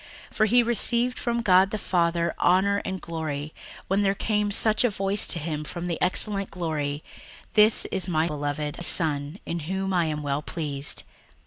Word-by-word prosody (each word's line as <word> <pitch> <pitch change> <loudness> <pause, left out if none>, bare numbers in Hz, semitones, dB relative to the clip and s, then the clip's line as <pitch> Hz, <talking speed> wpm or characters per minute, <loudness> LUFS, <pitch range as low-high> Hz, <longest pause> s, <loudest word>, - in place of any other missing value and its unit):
61:001:017 - - -14
For 215 - +4
he 240 +3 +4
received 240 +1 +2
from 235 -1 -1
God 190 -1 +4
the 215 - -3
Father 170 -3 0
honour 200 +3 +2
and 190 0 -4
glory, 155 -3 -5 0.3
when 195 +2 +1
there 195 -1 +1
came 210 0 -1
such 215 +2 +4
a 245 - +3
voice 195 0 +2
to - - +4
him 150 -1 -4
from 170 +3 -7
the 170 -2 -4
excellent 195 +2 +1
glory, 155 -4 -4 0.5
This 215 +1 +5
is 190 0 -1
my 160 -2 +1
beloved 150 0 -4
Son, 150 -1 +1
in 170 - -4
whom 190 +4 -3
I 175 -2 +2
am 150 -1 -3
well 140 0 -2
pleased. 145 -3 -3
180 Hz, 180 wpm, -25 LUFS, 155-200 Hz, 0.5 s, This